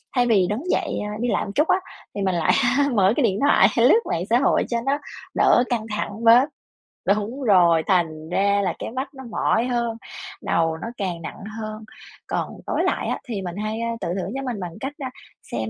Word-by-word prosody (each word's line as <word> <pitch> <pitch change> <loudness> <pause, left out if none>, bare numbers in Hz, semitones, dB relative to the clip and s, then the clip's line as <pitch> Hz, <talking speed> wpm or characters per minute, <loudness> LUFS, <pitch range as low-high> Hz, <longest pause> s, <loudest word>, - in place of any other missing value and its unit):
thay 245 -1 +3
vì 200 -6 +4
đứng 215 +7 -2
dậy, - - -1
a, 210 - -5
đi 240 - -1
lại - - 0
một 200 - -6
chút 300 +2 +3
á, 370 0 +3 0.4
thì 200 - -3
mình 190 -2 +1
lại 165 -2 +2 0.4
mở 195 -2 +4
cái 290 - +1
điện 200 -3 +1
thoại 280 -8 +5
lướt 255 - +6
mạng 170 - 0
xã 235 +2 +4
hội 275 - +3
cho 235 - 0
nó 280 +2 +1 0.4
đỡ 245 - +5
căng 230 -3 -1
thẳng 210 +1 -4
bớt 240 +5 +6 0.6
đúng 215 +7 0
rồi, 175 -7 +5
thành 160 -4 0
ra 200 +2 +2
là 180 - 0
cái - - -5
mắt 265 +4 -4
nó 265 - -10
mỏi 225 +2 +1
hơn, 235 -2 -1 0.4
đầu 165 -1 0
nó 225 - -6
càng 180 -5 -3
nặng 165 - -8 0.2
hơn. 215 0 -6 0.4
Còn - - -2 0.2
tối - - 0
lại - - 0
á, - - -2
thì 210 -5 -3
mình 175 -2 -5
hay, 215 +2 -3
ơ, 230 - -1
tự - - -2
thưởng 190 - -4
cho 270 - -2
mình 245 -5 -3
bằng 175 -3 -5
cách, 270 +2 -4
a, 270 -4 -4 0.4
xem 110 -1 -2
215 Hz, 220 wpm, -23 LUFS, 185-245 Hz, 0.6 s, lướt